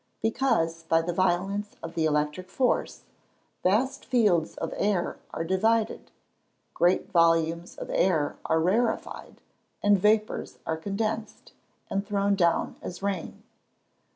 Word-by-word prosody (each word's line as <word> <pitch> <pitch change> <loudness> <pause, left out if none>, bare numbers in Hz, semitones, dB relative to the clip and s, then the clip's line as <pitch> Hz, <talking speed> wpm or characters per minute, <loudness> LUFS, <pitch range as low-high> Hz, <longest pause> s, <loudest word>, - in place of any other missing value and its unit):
_ - - -46
Because, 225 -9 +1
by 165 0 +2
the 175 +1 -2
violence 190 +3 0
of 165 0 -6
the 165 -1 0
electric 150 +4 -1
force, 255 +5 0 0.6
vast 260 +9 +1
fields 205 -10 +2
of - - -4
air 200 -4 0
are - - -3
divided; 220 +6 +1 0.6
great 180 +3 +2
volumes 165 -1 +2
of - - -6
air 160 -6 +1
are 160 - +2
rarefied; 220 +8 -1 0.4
and 205 -1 +5
vapours 215 +2 +1
are 160 - -1
condensed, 215 +5 -4 0.4
and 195 0 -1
thrown 200 -1 +1
down 170 -4 +1
as 180 +2 -7
rain. 200 -3 -3
190 Hz, 125 wpm, -27 LUFS, 165-210 Hz, 0.6 s, and